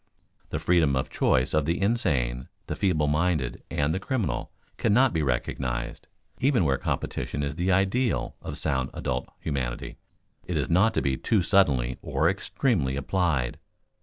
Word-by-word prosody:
The -, -, -2 dB
freedom 80 Hz, -6 st, +3 dB
of 65 Hz, -, -2 dB
choice 65 Hz, +1 st, +2 dB
of 75 Hz, -2 st, +2 dB
the 85 Hz, +3 st, 0 dB
insane, 70 Hz, -, 0 dB, 0.2 s
the -, -, -4 dB
feeble 85 Hz, -6 st, +1 dB
minded, 75 Hz, -3 st, 0 dB
and 75 Hz, +2 st, 0 dB
the 95 Hz, -, -1 dB
criminal, 110 Hz, +1 st, -2 dB, 0.3 s
cannot 125 Hz, +4 st, +3 dB
be 80 Hz, -, +1 dB
recognized. 60 Hz, -2 st, -2 dB, 0.3 s
Even 130 Hz, -, +3 dB
where 65 Hz, -3 st, +1 dB
competition 70 Hz, -, -2 dB
is 70 Hz, -1 st, -2 dB
the 90 Hz, +5 st, 0 dB
ideal 100 Hz, +6 st, +1 dB
of -, -, -6 dB
sound 65 Hz, -2 st, 0 dB
adult 65 Hz, 0 st, -2 dB
humanity, 65 Hz, -5 st, -4 dB, 0.4 s
it -, -, -3 dB
is -, -, -1 dB
not 100 Hz, +6 st, +4 dB
to -, -, +1 dB
be 65 Hz, -1 st, +1 dB
too 105 Hz, +3 st, +1 dB
suddenly 70 Hz, -11 st, +2 dB
or -, -, +1 dB
extremely 80 Hz, -, 0 dB
applied. 70 Hz, -3 st, 0 dB
75 Hz, 155 wpm, -26 LUFS, 65-95 Hz, 0.4 s, not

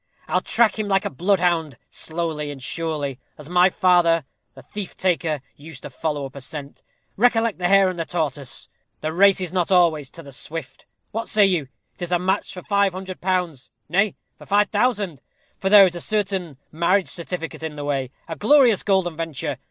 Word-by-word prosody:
I'll -, -, +1 dB
track 220 Hz, -1 st, +2 dB
him 215 Hz, -, -1 dB
like 195 Hz, 0 st, +1 dB
a -, -, -2 dB
bloodhound, 170 Hz, -, +1 dB
slowly 160 Hz, -2 st, -3 dB
and 145 Hz, -2 st, -7 dB
surely, 145 Hz, -1 st, -3 dB, 0.2 s
as 150 Hz, 0 st, -11 dB
my 180 Hz, +1 st, +5 dB
father, 175 Hz, -4 st, +3 dB, 0.3 s
the -, -, -13 dB
thief 205 Hz, -3 st, -7 dB
taker, 165 Hz, -5 st, 0 dB
used 145 Hz, -1 st, -12 dB
to -, -, -8 dB
follow 145 Hz, +1 st, -3 dB
up 135 Hz, -, -10 dB
a 140 Hz, -, -8 dB
scent. 140 Hz, +1 st, -8 dB, 0.4 s
Recollect 230 Hz, -2 st, +2 dB
the 175 Hz, -, +1 dB
hare 195 Hz, 0 st, +5 dB
and 185 Hz, -2 st, -3 dB
the 165 Hz, -, -1 dB
tortoise. 150 Hz, -6 st, -3 dB, 0.3 s
The 155 Hz, +1 st, -2 dB
race 195 Hz, +2 st, +5 dB
is 180 Hz, -2 st, -4 dB
not 180 Hz, 0 st, 0 dB
always 165 Hz, -6 st, +3 dB
to 165 Hz, -, -11 dB
the 140 Hz, -, -11 dB
swift. 145 Hz, 0 st, -7 dB, 0.2 s
What 225 Hz, +2 st, -4 dB
say 210 Hz, -1 st, +5 dB
you? 175 Hz, -8 st, +1 dB, 0.3 s
'Tis 175 Hz, -1 st, -5 dB
a 175 Hz, -, +4 dB
match 190 Hz, +3 st, -1 dB
for 180 Hz, -, -9 dB
five 200 Hz, -2 st, +2 dB
hundred 185 Hz, 0 st, -7 dB
pounds; 180 Hz, -7 st, -1 dB, 0.2 s
nay, 195 Hz, +5 st, +2 dB, 0.2 s
for -, -, -13 dB
five 205 Hz, +1 st, +3 dB
thousand: 205 Hz, -, 0 dB, 0.4 s
for 190 Hz, -, 0 dB
there 200 Hz, -1 st, +9 dB
is 180 Hz, -, 0 dB
a 175 Hz, -, -5 dB
certain 195 Hz, -8 st, -1 dB
marriage 175 Hz, +4 st, +2 dB
certificate 170 Hz, -2 st, -5 dB
in 160 Hz, -2 st, -5 dB
the 145 Hz, -1 st, -5 dB
way 135 Hz, -3 st, -1 dB, 0.2 s
a 165 Hz, -, -5 dB
glorious 245 Hz, -, +5 dB
golden 190 Hz, -4 st, +1 dB
venture! 155 Hz, -4 st, -4 dB
175 Hz, 190 wpm, -22 LUFS, 155-195 Hz, 0.4 s, there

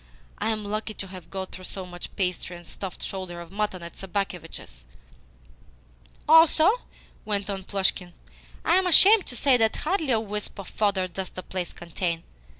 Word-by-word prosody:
"I -, -, 0 dB
am 215 Hz, -2 st, -1 dB
lucky 215 Hz, +1 st, -3 dB
to 195 Hz, -, -5 dB
have 185 Hz, -2 st, -10 dB
got 190 Hz, -1 st, -5 dB
through 185 Hz, -, -8 dB
so 190 Hz, 0 st, -5 dB
much 175 Hz, -1 st, -8 dB
pastry 180 Hz, -2 st, -1 dB
and 175 Hz, -1 st, -14 dB
stuffed 190 Hz, +2 st, -7 dB
shoulder 185 Hz, -3 st, -5 dB
of 170 Hz, 0 st, -10 dB
mutton 200 Hz, -3 st, -2 dB
at 170 Hz, -, -9 dB
Sobakevitch's!" 175 Hz, -, -5 dB, 1.4 s
"Also," 320 Hz, +1 st, +7 dB, 0.6 s
went 205 Hz, -1 st, -1 dB
on 195 Hz, -1 st, -4 dB
Plushkin, 190 Hz, -2 st, -1 dB, 0.5 s
"I 340 Hz, -, +5 dB
am 375 Hz, -1 st, +2 dB
ashamed 395 Hz, +4 st, +7 dB
to 245 Hz, -, -6 dB
say 255 Hz, +2 st, +4 dB
that 225 Hz, -2 st, +2 dB
hardly 320 Hz, -2 st, -1 dB
a 230 Hz, -3 st, +4 dB
wisp 210 Hz, -1 st, -5 dB
of 195 Hz, -, -7 dB
fodder 200 Hz, -3 st, +1 dB
does 185 Hz, +1 st, -5 dB
the 185 Hz, -, -8 dB
place 185 Hz, -2 st, -4 dB
contain. 170 Hz, 0 st, -3 dB
195 Hz, 170 wpm, -26 LUFS, 180-220 Hz, 1.4 s, Also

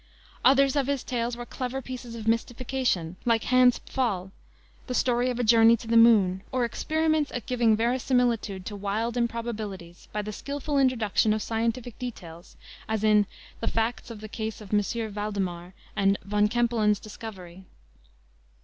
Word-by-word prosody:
Others 275 Hz, +1 st, +5 dB
of 280 Hz, -2 st, +1 dB
his 280 Hz, -3 st, -1 dB
tales 240 Hz, -1 st, -2 dB
were 240 Hz, -, -6 dB
clever 255 Hz, +2 st, -4 dB
pieces 250 Hz, -2 st, -7 dB
of 225 Hz, -1 st, -7 dB
mystification, 230 Hz, -6 st, -1 dB
like 230 Hz, -2 st, +2 dB
Hans 255 Hz, -1 st, +5 dB
Pfaall, 195 Hz, -8 st, -2 dB, 0.6 s
the 250 Hz, -, -3 dB
story 245 Hz, 0 st, +2 dB
of 245 Hz, -, -2 dB
a -, -, +1 dB
journey 230 Hz, 0 st, +6 dB
to 230 Hz, -, -11 dB
the 230 Hz, -, +1 dB
moon, 210 Hz, -5 st, +5 dB
or 255 Hz, -2 st, +1 dB
experiments 315 Hz, +4 st, 0 dB
at 245 Hz, -, -4 dB
giving 235 Hz, -3 st, +3 dB
verisimilitude 235 Hz, -5 st, 0 dB
to 210 Hz, -, -5 dB
wild 210 Hz, +4 st, -2 dB
improbabilities 220 Hz, -7 st, -4 dB
by 210 Hz, 0 st, -2 dB
the 215 Hz, +1 st, -5 dB
skillful 285 Hz, +4 st, -2 dB
introduction 225 Hz, -5 st, +2 dB
of 215 Hz, -, -2 dB
scientific 230 Hz, +1 st, -2 dB
details, 175 Hz, -9 st, -8 dB, 0.3 s
as 220 Hz, -1 st, -1 dB
in 210 Hz, -2 st, +4 dB, 0.3 s
the -, -, -3 dB
Facts 225 Hz, +2 st, -1 dB
in 230 Hz, -, -7 dB
the 215 Hz, +1 st, -8 dB
Case 220 Hz, 0 st, -5 dB
of 210 Hz, -2 st, -10 dB
M. 215 Hz, +2 st, 0 dB
Valdemar 190 Hz, -4 st, -4 dB, 0.2 s
and 195 Hz, 0 st, +3 dB
Von 210 Hz, +1 st, +2 dB
Kempelen's 225 Hz, -3 st, +1 dB
Discovery. 190 Hz, -4 st, -10 dB
230 Hz, 160 wpm, -27 LUFS, 210-245 Hz, 0.6 s, journey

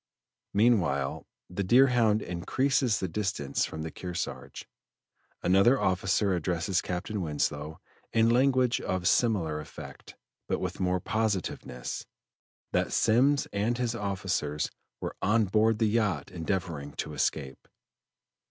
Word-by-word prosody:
Meanwhile 95 Hz, -, +2 dB, 0.2 s
the 90 Hz, +3 st, -3 dB
Deerhound 120 Hz, -1 st, +4 dB
increases 125 Hz, -, +1 dB
the 95 Hz, -, -1 dB
distance 95 Hz, -5 st, -1 dB
from 80 Hz, -, -6 dB
the 80 Hz, -, -5 dB
Kearsarge; 90 Hz, -1 st, -6 dB, 0.8 s
another 100 Hz, +9 st, +5 dB
officer 95 Hz, +1 st, +1 dB
addresses 90 Hz, +1 st, 0 dB
Captain 95 Hz, +3 st, -3 dB
Winslow 75 Hz, -1 st, -2 dB, 0.3 s
in 115 Hz, 0 st, +4 dB
language 125 Hz, 0 st, +3 dB
of 90 Hz, -1 st, -1 dB
similar 90 Hz, -10 st, +2 dB
effect, 75 Hz, -, -10 dB, 0.3 s
but -, -, 0 dB
with -, -, -4 dB
more 90 Hz, 0 st, +1 dB
positiveness, 100 Hz, -, -3 dB, 0.6 s
that -, -, +1 dB
Semmes 130 Hz, +5 st, +3 dB
and 110 Hz, +4 st, 0 dB
his 120 Hz, -2 st, -1 dB
officers 95 Hz, -8 st, -2 dB, 0.3 s
were -, -, -5 dB
on 110 Hz, +2 st, +3 dB
board 110 Hz, +3 st, +3 dB
the 110 Hz, -, +2 dB
yacht 105 Hz, -9 st, 0 dB
endeavoring 85 Hz, -5 st, -3 dB
to -, -, -5 dB
escape. 70 Hz, -3 st, -2 dB
95 Hz, 115 wpm, -29 LUFS, 85-115 Hz, 0.8 s, another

